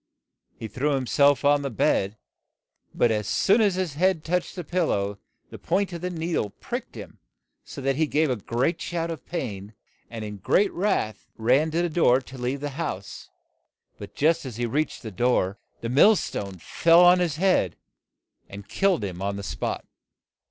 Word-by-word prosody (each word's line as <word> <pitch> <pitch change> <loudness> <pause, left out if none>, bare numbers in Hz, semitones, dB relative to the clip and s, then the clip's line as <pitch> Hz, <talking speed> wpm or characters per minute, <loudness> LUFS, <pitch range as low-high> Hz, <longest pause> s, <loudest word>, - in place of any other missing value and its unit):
He 110 - -6
threw 140 +6 -1
him 130 -1 -2
self 140 +3 +3
on 145 0 +4
the 140 - -3
bed, 105 -2 0 0.7
but 120 - +2
as 105 -2 -1
soon 210 +4 +3
as 200 -4 +3
his 185 -5 -2
head 175 +1 +1
touched 180 +1 -2
the 180 - -5
pil 175 +1 0
low 100 0 -1 0.3
the - - -9
point 195 -2 0
of 170 - -6
the 180 - -2
nee 170 -1 -4
dle 105 - 0
pricked - - -7
him - - -10 0.4
so - - -9
that 135 0 0
he 160 0 +2
gave 150 -1 +1
a 120 - -1
shout 170 -1 -3
of 160 -5 -8
pain, 110 - -5 0.3
and 115 -2 -6
in 105 -1 -7
great 195 - +2
wrath 180 - -1
ran 130 +8 +3
to 165 +2 0
the - - +1
door 155 -6 +3
to 130 0 -12
leave 130 +3 -2
the 145 0 -3
house. 100 - -5 0.7
But - - -10
just 160 +3 +2
as 130 -5 -7
he 120 +1 -2
reached 145 +6 -2
the 110 - -6
door 105 -3 +1 0.2
the 115 - -3
mill 155 - +6
stone 100 - -4
fell 165 - +4
on 180 +1 +6
his 170 -4 0
head 165 - +2 0.7
and 100 +1 -10
killed 195 - +1
him 95 -2 -5
on 100 +1 -2
the 100 - -6
spot. 80 -6 -4
140 Hz, 190 wpm, -25 LUFS, 110-170 Hz, 0.7 s, mill